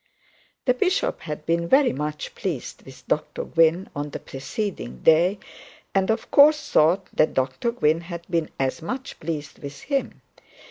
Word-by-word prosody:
The 250 - +4
bishop 375 - 0
had 150 -1 -6
been 170 0 0
very 270 +6 +4
much 150 +2 -4
pleased 165 -10 -4
with 135 -1 -14
Dr 155 - -1
Gwynne 165 +3 +3
on 145 +1 -3
the - - -5
preceding 135 - -5
day, 175 +5 +5 0.6
and 195 0 +2
of 220 +1 -1
course 300 +1 +5
thought 175 +5 +4
that 155 - +2
Dr 130 - 0
Gwynne 165 -9 +1
had 170 0 -8
been 165 -3 -1
very 135 -1 +1
much 255 +10 -5
pleased 150 -3 -5
with 140 0 -8
him. 275 -2 -2
165 Hz, 155 wpm, -24 LUFS, 150-220 Hz, 0.6 s, day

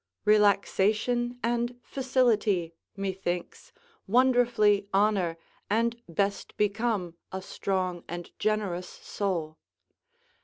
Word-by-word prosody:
Relaxation 215 +3 +3
and 240 +1 -1
facility, 225 -10 +1 0.2
methinks, 190 - -4 0.4
wonderfully 235 -4 +3
honour 195 -4 +2 0.3
and 230 +2 +1
best 200 +4 -2
become 210 -4 0 0.2
a 190 - -3
strong 185 -2 -2
and 175 0 -6
generous 200 -5 -1
soul. 170 -6 -3
205 Hz, 80 wpm, -28 LUFS, 185-235 Hz, 0.4 s, Relaxation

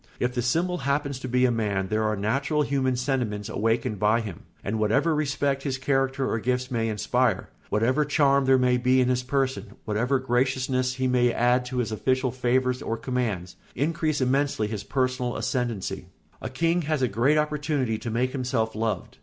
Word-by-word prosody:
If 125 0 0
the 125 - -1
symbol 175 +9 0
happens 140 -1 -1
to 130 - -5
be 125 +1 +2
a 125 - +3
man 100 -4 -1
there 110 0 +1
are 110 0 +1
natural 135 +9 0
human 135 -2 0
sentiments 120 -5 -2
awakened 110 -1 0
by 110 +3 +3
him; 100 -7 -8 0.2
and 110 +3 -2
whatever 130 +10 +2
respect 140 -2 0
his 135 -2 -2
character 135 0 0
or 115 - -1
gifts 125 +2 -1
may 115 -2 0
inspire, 110 +1 0 0.2
whatever 125 +8 +2
charm 140 -2 +3
there 130 0 +5
may 125 -1 +3
be 130 +1 +3
in 125 -1 +3
his 125 0 +1
person, 125 -6 -2
whatever 120 +6 +1
graciousness 130 0 0
he 130 0 -1
may 125 -1 +3
add 125 +1 +2
to 125 +1 -5
his 120 -3 -1
official 130 +3 0
favours 125 0 0
or 115 - -2
commands, 115 -7 -3 0.2
increase 155 +1 0
immensely 135 -3 +1
his 105 -2 -4
personal 130 0 -1
ascendency. 110 -7 -2 0.3
A - - -4
king 165 +7 +1
has 155 -3 -1
a - - +4
great 120 +8 +2
opportunity 150 -6 0
to 115 - -5
make 125 +3 0
himself 125 -4 -1
loved. 110 -4 -3
125 Hz, 185 wpm, -26 LUFS, 115-135 Hz, 0.3 s, there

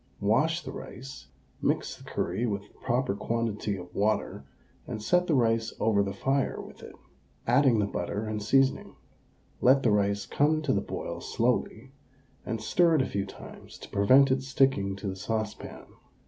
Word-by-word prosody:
Wash 145 +12 +2
the - - -6
rice, 130 +1 -9 0.3
mix - - 0
the - - -16
curry 120 - -2
with 100 -2 -2
the 105 - -22
proper 125 -3 0
quantity 105 -1 -2
of 90 -1 -10
water, 105 +2 -1 0.4
and 110 - -4
set 180 +11 +2
the 160 - +2
rice 115 -2 +1
over 110 -2 +3
the 100 -1 -1
fire 135 +7 -1
with - - -11
it, - - -11 0.5
adding 125 0 +4
the 105 - +2
butter 100 +2 -3
and 110 -1 -3
seasoning. 135 +5 +2 0.7
Let 135 +2 +5
the 115 - +3
rice 100 0 +1
come 155 +5 +1
to 140 - +1
the - - +1
boil - - -5
slowly, 120 +1 -1 0.6
and 115 - -2
stir 165 +9 +3
it 140 - +3
a - - -4
few 100 0 -2
times - - -12
to - - -11
prevent 130 +7 +5
it 130 0 +2
sticking 130 -7 +1
to 100 +1 -6
the 95 - -3
saucepan. 110 +2 -4
115 Hz, 175 wpm, -28 LUFS, 100-135 Hz, 0.7 s, Let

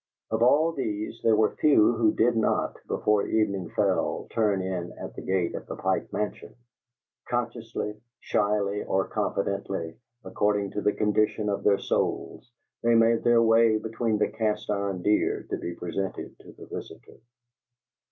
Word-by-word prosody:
Of - - 0
all 145 +7 +4
these, 110 -6 -4
there 115 -1 +4
were 110 0 +2
few 130 -7 +5
who 110 -1 +3
did 120 +2 +2
not, 110 - +1
before 105 -1 +1
evening 100 -5 0
fell, - - 0
turn 105 -4 +1
in 90 -2 -3
at - - -8
the - - -6
gate 95 -2 0
of - - -7
the - - -5
Pike - - -1
Mansion. 105 - -4 0.7
Consciously, 115 -3 -3 0.2
shyly 105 -1 0
or 95 0 0
confidently, 100 -2 -3 0.2
according 105 -1 0
to 105 - -3
the 105 - +2
condition 105 0 +1
of 100 - -2
their 100 -1 +4
souls, 120 - -2 0.3
they 120 0 +3
made 115 0 +4
their 120 -1 +5
way 115 -1 +5
between 110 0 -1
the 105 - +1
cast 105 -1 -2
iron 100 -3 -2
deer 105 0 +1
to - - 0
be 85 - -5
presented 95 +3 -4
to - - -14
the - - -12
visitor. - - -10
105 Hz, 155 wpm, -27 LUFS, 100-115 Hz, 0.7 s, few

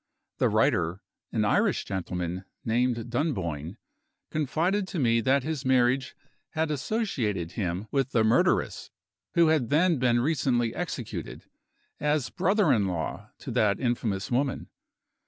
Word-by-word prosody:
The - - +3
writer 85 +3 +2 0.3
an - - +1
Irish - - +2
gentleman, 90 -1 -3 0.2
named 120 0 0
Dunboyne 95 - -2 0.5
confided 170 +7 0
to 185 - -5
me 115 -5 +3
that 130 +3 +2
his 155 -2 -3
marriage 130 0 +2 0.4
had 160 -1 0
associated 130 - -1
him 90 -1 -3
with 135 -2 +1
the 115 -4 +2
murderess, 110 +1 +2 0.5
who 170 -2 +5
had 150 -8 +2
then 165 0 +3
been 120 -1 +3
recently 125 -4 +1
executed, 140 -10 -5 0.5
as 150 -3 0
brother 195 -3 +3
in 100 -4 +2
law 85 -4 -4
to - - -7
that 100 -2 +2
infamous 115 -5 -1
woman. 135 +2 -1
125 Hz, 130 wpm, -27 LUFS, 105-150 Hz, 0.5 s, who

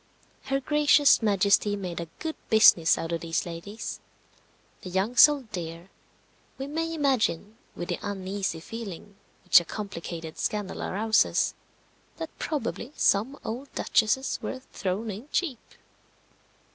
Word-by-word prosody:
Her 270 0 0
Gracious 295 0 +4
Majesty 205 0 +3
made 180 -4 -5
a 170 - -5
good 320 0 -4
business 200 -7 +6
out 165 - -4
of 165 -1 -2
these 165 -1 -1
ladies. 180 +6 -6 0.8
The 185 - -7
young 190 +6 -1
sold 280 -4 +6
dear. 170 -1 -6 0.7
We 270 - -4
may 325 +3 -3
imagine, 240 - 0 0.2
with 175 - -6
the - - -2
uneasy 190 -3 -3
feeling 205 -2 -8 0.3
which - - +7
a - - -6
complicated 170 -4 -7
scandal 210 -3 -2
arouses, 220 +3 +2 0.6
that 325 -1 -6
probably 290 -3 -3
some 230 +8 +2
old 255 +5 -5
duchesses 240 +5 +1
were 260 - -5
thrown 200 +4 -2
in 220 +9 -9
cheap. 290 -10 -1
210 Hz, 130 wpm, -27 LUFS, 185-265 Hz, 0.8 s, which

